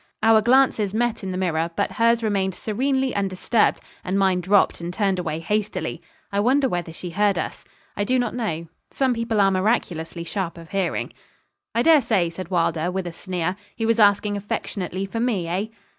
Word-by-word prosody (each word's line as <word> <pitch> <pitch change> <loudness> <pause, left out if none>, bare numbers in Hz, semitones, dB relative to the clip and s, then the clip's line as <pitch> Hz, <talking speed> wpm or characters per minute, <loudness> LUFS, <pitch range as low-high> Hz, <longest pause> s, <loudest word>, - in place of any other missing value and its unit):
Our 220 0 +6
glances 235 -4 +3
met 240 -2 0
in 190 - -3
the 185 - -3
mirror; 165 -3 0
but 200 - 0
hers 230 0 +2
remained 195 -3 0
serenely 265 +4 0
undisturbed, 200 +3 +1 0.2
and 185 +2 -1
mine 190 -2 +2
dropped 195 0 +3
and 170 +1 -4
turned 195 -1 0
away 160 -3 -2
hastily. 190 -2 -2 0.3
I 200 - 0
wonder 265 +6 +3
whether 175 -7 -3
she 175 +2 -7
heard 200 +1 +2
us. - - -4 0.3
I 205 - 0
do 255 +5 +1
not 245 -2 0
know. 170 -9 -3 0.2
Some 265 -2 +1
people 230 -2 -1
are 195 -1 +5
miraculously 185 -4 -1
sharp 175 -1 -3
of 165 +1 -12
hearing. 195 -3 -1 0.6
'I 230 - +3
dare 320 -2 +6
say,' 195 -8 +1
said 185 0 -7
Wylder, 170 -2 +1
with 190 0 -3
a 175 - -5
sneer, 180 0 -3 0.2
'he 225 - -2
was 230 0 +2
asking 205 0 +4
affectionately 195 -2 -3
for 225 +4 -4
me, 220 -8 0
eh?' 185 +5 -1
195 Hz, 190 wpm, -23 LUFS, 180-225 Hz, 0.6 s, Our